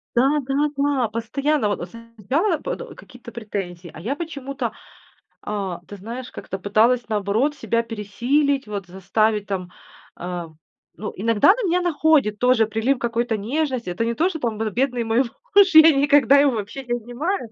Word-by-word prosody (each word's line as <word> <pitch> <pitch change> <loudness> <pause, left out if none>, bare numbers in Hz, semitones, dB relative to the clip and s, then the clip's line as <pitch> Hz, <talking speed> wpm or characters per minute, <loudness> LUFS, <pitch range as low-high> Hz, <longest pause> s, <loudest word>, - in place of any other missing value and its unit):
Да-да-да. 280 -1 +1
Постоянно. 260 +3 -1
Вот, 205 - -2
э, - - -3
см 230 +4 -13 0.2
я 330 +4 +2
пот - - -4
э, - - -10
какие-то 245 -1 -13
претензии. 190 -6 -6
А - - -10
я 235 - -3
почему-то, 275 -6 -5 0.7
а, 195 -4 -4
ты 205 - -8
знаешь, 235 +6 -7
как-то 190 - -7
пыталась, 225 +5 +2
наоборот, 215 +7 0
себя 230 -4 -1
пересилить, 245 +6 0
вот, 200 -3 -5
заставить 205 +3 0
там, 185 -3 -4 0.5
а. 175 -1 -5 0.5
Ну, 215 - -5
иногда 220 - +2
на 435 +2 +4
меня 360 +1 +2
находит 310 -10 +2
тоже 250 -2 +3
прилив 225 +5 0
какой-то 235 -1 -1
нежности. 255 - -2
Это 205 +6 -2
не 235 - -1
то, 330 +8 +2
что 350 -4 -5
там 230 -6 -2
вот, 220 -1 -2
бедный 250 -1 0
мой 225 +1 0 0.4
муж, 390 -3 +6
я 315 +1 +10
никогда 285 0 +5
его 280 -1 +4
вообще 225 +4 -5
не 240 - -4
обнимаю, 245 - -3
235 Hz, 170 wpm, -22 LUFS, 210-285 Hz, 0.7 s, я